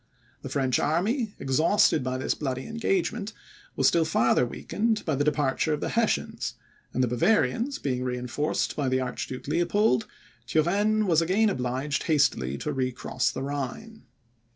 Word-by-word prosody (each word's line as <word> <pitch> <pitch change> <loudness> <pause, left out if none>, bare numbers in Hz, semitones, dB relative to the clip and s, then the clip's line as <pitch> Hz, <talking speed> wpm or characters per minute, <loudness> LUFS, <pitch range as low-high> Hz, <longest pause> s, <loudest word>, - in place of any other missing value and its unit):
The 135 - -7
French 130 -2 +1
army, 210 - 0
exhausted 155 +3 +3
by 130 0 -2
this 130 - 0
bloody 130 -3 -4
engagement, 230 - -1 0.4
was - - +3
still 170 - +4
farther 125 -6 +2
weakened 220 - -2
by 155 - 0
the 140 +1 +1
departure 150 +1 +1
of 150 - -2
the - - -2
Hessians, 230 -1 -1 0.4
and 130 - 0
the - - +2
Bavarians 210 - +1
being 125 -2 -2
reinforced 125 +4 -2
by 140 -3 0
the 130 0 +1
Archduke 130 0 -5
Leopold, 170 - +2 0.4
Turenne 200 - +2
was 170 -4 +3
again 200 +6 +2
obliged 130 +1 -2
hastily 70 - +1
to - - -3
recross 130 0 -1
the - - -5
Rhine. 145 - -5
150 Hz, 150 wpm, -27 LUFS, 130-205 Hz, 0.4 s, still